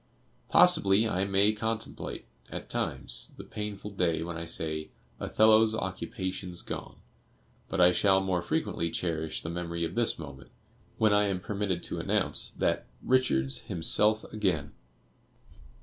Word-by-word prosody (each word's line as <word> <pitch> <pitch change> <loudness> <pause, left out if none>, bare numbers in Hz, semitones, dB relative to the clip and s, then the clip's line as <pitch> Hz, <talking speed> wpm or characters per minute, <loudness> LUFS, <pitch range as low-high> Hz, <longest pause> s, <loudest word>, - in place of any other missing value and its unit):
Possibly 100 +3 +6
I 95 -2 0
may 100 +2 +3
contemplate, 110 +1 -4 0.2
at - - -7
times, - - -1
the - - -8
painful 105 -1 -6
day 85 -4 0
when 85 0 -5
I 85 0 -5
said: 80 -1 -2 0.3
'Othello's 110 0 +4
occupation's 95 -2 -4
gone;' - - -7 0.7
but - - -3
I 90 0 +7
shall 95 +1 +3
more 95 -2 -1
frequently 85 -1 -2
cherish 80 -2 -3
the 80 - -4
memory 85 -1 -4
of 80 - -3
this 120 -1 +1
moment, 70 -4 -10 0.5
when 110 -2 +3
I 105 0 +4
am 95 -2 -1
permitted 100 -2 -3
to - - -4
announce - - +2
that - - -1 0.2
'Richard's 70 - +2
himself 105 +6 +1
again. 90 -9 -1
95 Hz, 135 wpm, -29 LUFS, 85-105 Hz, 0.7 s, I